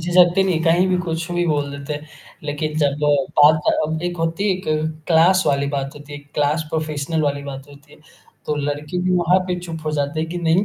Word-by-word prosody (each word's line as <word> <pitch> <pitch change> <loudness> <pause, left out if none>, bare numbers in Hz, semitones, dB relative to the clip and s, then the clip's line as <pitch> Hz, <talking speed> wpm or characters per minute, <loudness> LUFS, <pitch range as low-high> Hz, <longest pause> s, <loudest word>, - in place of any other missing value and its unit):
झिझकते 175 +2 +4
नहीं 175 -4 0
कहीं 170 +3 +4
भी 180 - +2
कुछ 170 -1 -3
भी 175 0 +1
बोल 145 -2 0
देते 140 +1 -6
हैं। 150 +1 -6 0.4
लेकिन 150 +1 -3
जब 140 -2 +2 0.4
बात 155 +1 +7 0.3
अब 160 +2 -3
एक 175 0 -2
होती 165 +4 -1
है - - +3
एक 185 - -10 0.4
क्लास 175 +3 +5
वाली 140 0 +2
बात 135 0 -3
होती 145 0 -12
है, 145 - -6
एक 145 0 -20
क्लास 150 +2 +1
प्रोफेशनल 155 0 -2
वाली 140 -1 -1
बात 140 0 -8
होती 145 +1 -17
है। - - -17 0.5
तो 150 - 0
लड़के 150 +4 -3
भी 185 - 0
वहाँ 175 +2 +3
पे 180 -1 -2
चुप 165 -2 -6
हो 155 - -1
जाते 145 +2 -1
हैं 160 - -2
कि 175 +1 -4
नहीं 170 +3 +2
155 Hz, 225 wpm, -20 LUFS, 145-175 Hz, 0.5 s, बात